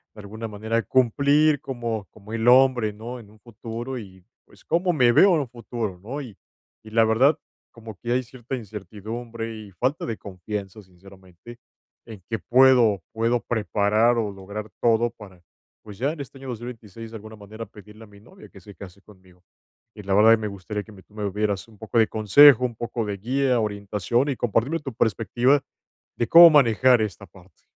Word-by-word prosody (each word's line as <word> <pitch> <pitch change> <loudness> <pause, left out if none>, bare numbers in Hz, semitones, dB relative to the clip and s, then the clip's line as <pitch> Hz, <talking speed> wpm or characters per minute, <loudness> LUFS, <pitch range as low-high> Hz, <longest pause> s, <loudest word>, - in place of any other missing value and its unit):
de - - -13
alguna 110 +3 -7
manera 110 +2 -2
cumplir 140 +4 +2
como 115 -6 -5
como 105 +1 -15
el 115 +1 -2
hombre, 125 -4 +4
¿no?, 115 +4 -8
en 110 -4 -15
un 110 - -21
futuro, 120 +3 -7
y 95 -4 -13 0.2
pues, - - -22
cómo 175 +2 0
me 125 -6 +4
veo 195 +9 +6
en 155 - +1
un 135 - -6
futuro, 115 -5 -6
¿no?, 130 +9 -6
y 115 -8 -11 0.5
y - - -11
la 115 0 +4
verdad, 130 +8 +3 0.3
como 110 -2 -11
que 120 - -5
hay 130 +1 0
cierta 125 +1 -7
incertidumbre 110 +2 -7
y 105 -2 -11
falta 130 - -2
de 115 -2 -4
confianza, 100 +2 -7
sinceramente, 95 +3 -16 0.5
en 110 -4 -11
que 110 -1 -2
puedo 125 -6 +4
puedo 115 +2 0
preparar 110 +1 +1
o 110 -3 -1
lograr 100 +2 -8
todo 115 0 +2
para, 100 -6 -15 0.4
pues, 105 -2 -12
ya 140 +3 0
en 165 - -12
este 135 0 -11
año 135 0 -9
2026 115 -2 -9
de - - -10
alguna 110 +1 -12
manera 110 +2 -9
pedirle 105 +1 -15
a - - -20
mi 100 0 -18
novia 190 - -16
que - - -15
se 100 +2 -14
case 100 0 -12
conmigo. 95 -3 -21 0.5
Y 105 - -10
la 95 0 -1
verdad 105 +3 +6
que - - +6
me 110 - -4
gustaría 100 +1 -6
que 110 - -15
tú 105 - -27
me 105 -1 -3
dieras 105 -1 -2
un 110 -2 -19
poco 110 +2 -2
de 110 - +5
consejo, 125 +5 +6
un 120 -2 -3
poco 120 0 -4
de 100 -1 -4
guía, 130 +4 0
orientación 105 +4 -1
y 140 - -2
compartirme 120 +8 0
tu 135 -5 -7
perspectiva 120 +5 +1 0.5
de 120 - -2
cómo 170 +1 +10
manejar 125 -4 +4
esta 100 -7 -5
parte. - - -21
115 Hz, 190 wpm, -23 LUFS, 105-125 Hz, 0.5 s, cómo